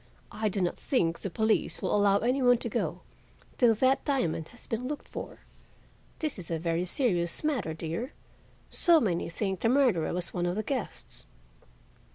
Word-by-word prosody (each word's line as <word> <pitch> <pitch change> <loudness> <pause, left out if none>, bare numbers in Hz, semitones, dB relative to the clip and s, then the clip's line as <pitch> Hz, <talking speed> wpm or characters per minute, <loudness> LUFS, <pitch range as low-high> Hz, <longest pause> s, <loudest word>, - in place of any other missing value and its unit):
I 215 0 -1
do 195 0 -2
not 175 - -1
think 170 -11 0
the 195 - -4
police 220 +5 +1
will - - 0
allow 200 -1 +4
any 250 +6 +1
one 245 -1 +5
to - - -4
go - - -2 0.6
till 235 -3 +5
that 260 +4 +2
diamond 170 - 0
has 240 - -12
been 235 +3 -3
looked 295 +1 -5
for. - - -8 0.8
This 305 -9 -3
is 170 - -7
a 165 - 0
very 165 +2 -1
serious 180 - +2
matter, 245 - -1
dear. 170 - -4 0.5
So 340 -2 +4
many 180 - 0
think 190 +1 -2
the 230 - +2
murderer 245 - +3
was 175 -1 -2
one 175 0 0
of 175 - -1
the 215 - -1
guests." 255 0 -5
210 Hz, 180 wpm, -29 LUFS, 175-255 Hz, 0.8 s, one